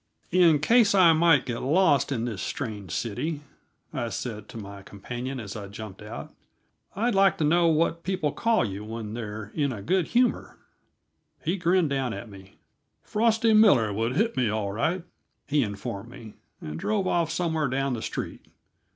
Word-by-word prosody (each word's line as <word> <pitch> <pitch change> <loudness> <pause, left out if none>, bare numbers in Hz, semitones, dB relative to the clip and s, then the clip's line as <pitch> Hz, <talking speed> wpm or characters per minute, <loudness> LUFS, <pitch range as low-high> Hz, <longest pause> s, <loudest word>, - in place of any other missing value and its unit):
"In 170 -3 +5
case 215 +7 +4
I 175 -4 +7
might 160 -4 +4
get 120 -2 -4
lost 145 -1 +3
in 120 -4 -1
this 110 -5 -4
strange 105 -4 -5
city," 145 +7 -3 0.5
I 120 -5 -2
said 110 0 -5
to - - -9
my 100 -2 -8
companion 120 +7 -6
as 100 -2 -7
I 105 -2 -6
jumped 100 -1 -9
out, 105 - -8 0.6
"I'd 230 +4 +1
like 195 0 +4
to - - -1
know 170 +3 +4
what 165 +1 +2
people 175 -5 -1
call 225 - +1
you 100 0 -5
when 110 -1 -6
they're 105 -2 -6
in 145 -3 0
a 105 -5 -6
good 185 - +1
humor." 245 +1 +1 0.9
He 170 +4 +1
grinned 175 -3 +2
down 135 -3 -1
at 110 +3 -8
me. 95 -1 -14 0.5
"Frosty 225 +1 +2
Miller 145 - +5
would 115 +5 -1
hit 225 +5 +1
me, 120 -3 +1
all 105 -2 -2
right," 160 - -1 0.4
he 145 0 +2
informed 100 0 -4
me, 115 -3 -11 0.3
and 75 +1 -6
drove 210 -3 0
off 170 -3 +1
somewhere 160 -3 0
down 135 +1 -1
the 115 - -4
street. - - -5
135 Hz, 175 wpm, -26 LUFS, 110-170 Hz, 0.9 s, I